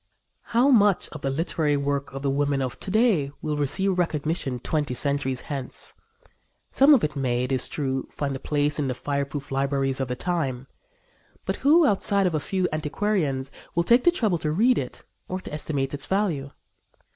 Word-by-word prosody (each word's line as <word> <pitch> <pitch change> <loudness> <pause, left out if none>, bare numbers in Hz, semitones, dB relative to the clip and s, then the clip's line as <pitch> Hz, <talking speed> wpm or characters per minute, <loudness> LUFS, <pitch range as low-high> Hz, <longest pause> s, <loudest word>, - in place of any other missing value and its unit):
How 245 +4 +3
much 205 -6 +4
of 150 - -9
the 135 - -1
literary 150 0 0
work 140 0 -2
of 135 +1 -7
the 140 - +1
women 140 -1 +1
of 130 - -5
to - - -6
day 205 - +3
will 150 -1 -2
receive 180 +6 0
recognition 155 -5 -1
twenty 145 0 -1
centuries 140 -2 0
hence? 135 -3 -4 0.8
Some 285 +2 +7
of 245 - +1
it 150 -1 -1
may, 125 -3 0
it 125 - -3
is 130 -2 +1
true, 135 -3 -2
find 140 -2 -3
a - - -5
place 145 +1 0
in 145 - 0
the 130 - -2
fireproof 140 +1 -3
libraries 135 0 0
of 135 - -1
the 125 - -3
time; 135 -6 -2 0.8
but - - -2
who, 315 +4 +5
outside 200 -3 +2
of 180 - +1
a 155 - +1
few 185 +4 -1
antiquarians, 150 -4 -1 0.2
will 170 - +3
take 235 +7 +4
the - - +6
trouble 215 - +1
to 150 - -1
read 230 +10 +3
it 125 - -6 0.2
or 185 - -3
estimate 145 -3 -3
its 145 0 -5
value? 180 -9 0
145 Hz, 185 wpm, -25 LUFS, 135-185 Hz, 0.8 s, Some